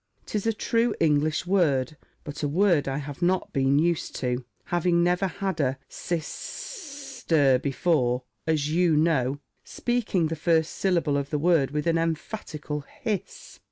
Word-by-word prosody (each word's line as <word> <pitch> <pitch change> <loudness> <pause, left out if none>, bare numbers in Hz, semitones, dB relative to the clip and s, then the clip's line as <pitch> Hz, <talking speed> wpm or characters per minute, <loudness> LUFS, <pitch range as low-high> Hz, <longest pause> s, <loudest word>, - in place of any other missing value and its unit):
'Tis 210 +1 -2
a 225 - +2
true 230 +2 +1
English 155 +1 +2
word, 155 -8 +2 0.3
but 145 0 -7
a 145 - +1
word 170 -1 +3
I 135 0 -1
have 145 +1 -7
not 180 +1 +1
been 135 +1 +3
used 170 +1 0
to, 125 -1 -2 0.2
having 175 0 +1
never 180 +2 +2
had 190 -2 -3
a 135 -2 +1
sis 170 -2 -3
s 290 - -8
s - - -16
ter 140 -6 +4
before, 130 -3 +1 0.2
as 155 -2 +1
you 170 -1 +3
know," 145 -4 +2 0.3
Speaking 220 -9 -1
the 165 - -2
first 160 0 +1
syllable 170 -7 +1
of 140 0 -3
the 150 - 0
word 155 -3 +3
with 150 +1 -2
an 165 -1 +2
emphatical 160 -2 -3 0.2
hiss. 210 -4 -4
160 Hz, 160 wpm, -26 LUFS, 145-180 Hz, 0.3 s, ter